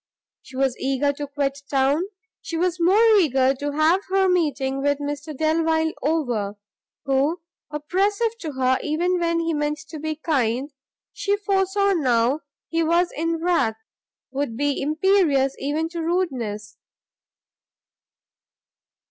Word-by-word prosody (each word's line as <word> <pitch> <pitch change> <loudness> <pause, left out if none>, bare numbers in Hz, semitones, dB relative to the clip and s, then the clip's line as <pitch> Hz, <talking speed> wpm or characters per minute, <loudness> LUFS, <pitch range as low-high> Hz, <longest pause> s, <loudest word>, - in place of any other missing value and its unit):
She 260 - -14
was 265 -2 +1
eager 275 +2 +1
to 290 +1 -5
quit 280 -1 -2
town, 280 +5 +2 0.4
she 330 - -4
was 360 +1 0
more 385 +7 +5
eager 265 -6 +3
to 285 +2 -4
have 320 +6 +3
her 385 0 +3
meeting 280 -7 0
with 285 0 +1
Mr 290 +1 -5
Delvile 320 +1 +1
over, 245 -10 -1 0.5
who, 275 +5 +1 0.3
oppressive 395 +9 0
to 310 -4 -5
her 260 0 +1
even 350 +4 0
when 335 -1 +1
he 330 0 -1
meant 295 0 -1
to 310 -1 -7
be 310 +1 -3
kind, 275 -3 -1 0.4
she 405 0 0
foresaw, 395 0 +1
now 255 -4 +2 0.3
he 330 0 0
was 340 +2 +2
in 330 +2 0
wrath, 275 -11 +1 0.5
would 270 -4 -3
be 285 0 0
imperious 305 -3 +2
even 300 +4 -1
to 340 0 -5
rudeness. 245 - -2
300 Hz, 130 wpm, -23 LUFS, 270-340 Hz, 0.5 s, more